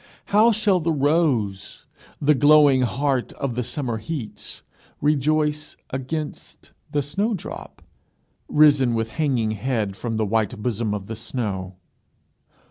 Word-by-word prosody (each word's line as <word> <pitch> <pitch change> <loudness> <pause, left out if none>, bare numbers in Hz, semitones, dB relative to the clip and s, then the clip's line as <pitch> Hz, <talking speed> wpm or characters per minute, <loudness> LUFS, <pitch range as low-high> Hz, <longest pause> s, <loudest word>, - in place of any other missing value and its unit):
How 220 +3 +6
shall 210 -3 +2
the 165 0 0
rose, 140 - 0 0.3
the 150 +1 +4
glowing 145 -1 +5
heart 130 +3 0
of 135 -3 -3
the 125 +1 -2
summer 120 -3 -3
heats, 135 -2 -6 0.4
rejoice 150 +1 0
against 145 +4 -5 0.2
the 145 -1 0
snowdrop 200 - -4 0.7
risen 145 -5 +5
with 115 0 -1
hanging 125 -6 0
head 110 -3 -2
from 115 +1 -3
the 110 - +1
white 110 +2 0
bosom 110 -2 -1
of 100 -2 -6
the 115 - -6
snow? 100 -5 -4
130 Hz, 125 wpm, -23 LUFS, 110-150 Hz, 0.7 s, How